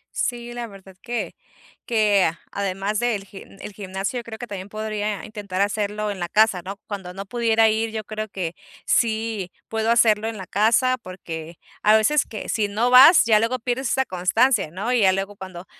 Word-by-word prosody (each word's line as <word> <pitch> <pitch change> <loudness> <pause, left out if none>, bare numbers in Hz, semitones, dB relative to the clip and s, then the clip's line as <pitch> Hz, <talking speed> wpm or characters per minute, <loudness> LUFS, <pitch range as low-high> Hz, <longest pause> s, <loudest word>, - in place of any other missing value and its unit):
Sí, 240 -1 -2
la 240 -1 -5
verdad 195 -2 -14
que 240 -1 -4 0.5
que 210 -4 +3
a 165 +2 -2
además 200 +1 -2
del 225 -5 -1
gimn 195 0 -13
el 205 - -8
gimnasio 195 +4 -4
yo - - -8
creo 220 -1 -8
que 245 - -6
también 200 -2 -7
podría 215 -1 -3
intentar 200 -3 -4
hacerlo 210 0 -1
en 190 - -7
la 175 -1 -3
casa, 215 -4 +3
¿no? 195 +2 -6
Cuando 190 -3 -6
no 195 +1 -6
pudiera 225 0 +2
ir 220 +1 +1
yo 220 -1 -4
creo 215 +1 -5
que 180 -4 -4 0.3
sí 220 -4 0 0.2
puedo 225 0 -1
hacerlo 220 -2 +4
en 225 -2 -4
la 190 - -7
casa, 235 +6 +2
porque 165 -3 -8 0.3
a 215 +1 +6
veces 295 +7 +2
que 215 - -7
si 215 -2 0
no 225 +5 0
vas 270 +7 +9
ya 215 -2 +5
luego 230 +3 0
pierdes 245 +1 -2
esa 265 0 +1
constancia, 190 - +2
¿no? 205 +9 -3
Y 245 - +3
ya 190 -1 +5
luego 195 +1 -3
cuando 185 -2 -9
215 Hz, 200 wpm, -23 LUFS, 195-230 Hz, 0.5 s, vas